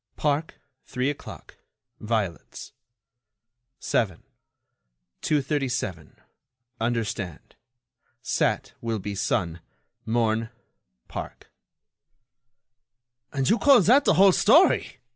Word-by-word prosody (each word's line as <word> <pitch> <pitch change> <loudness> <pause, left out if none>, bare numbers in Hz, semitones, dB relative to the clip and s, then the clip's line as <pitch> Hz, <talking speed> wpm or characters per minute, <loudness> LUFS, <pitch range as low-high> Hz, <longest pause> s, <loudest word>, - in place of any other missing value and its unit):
Park 150 +1 -1 0.3
three 130 +3 -1
o'clock. 145 - -11 0.4
Violets. 105 -6 -4 1.1
7. 95 -8 -1 1.0
237. 135 - -2 0.6
Understand. 110 -6 -3 0.7
Sat. - - -1
Will 115 -1 -2
be 105 0 -5
Sun. 90 -3 -1 0.4
morn. 115 -1 0 0.6
park. - - -8 1.8
"And 135 -2 -1
you 230 - +3
call 275 -4 +6
that 255 - +4
the - - +4
whole 195 +1 +7
story!" - - +4
115 Hz, 80 wpm, -25 LUFS, 105-145 Hz, 1.8 s, whole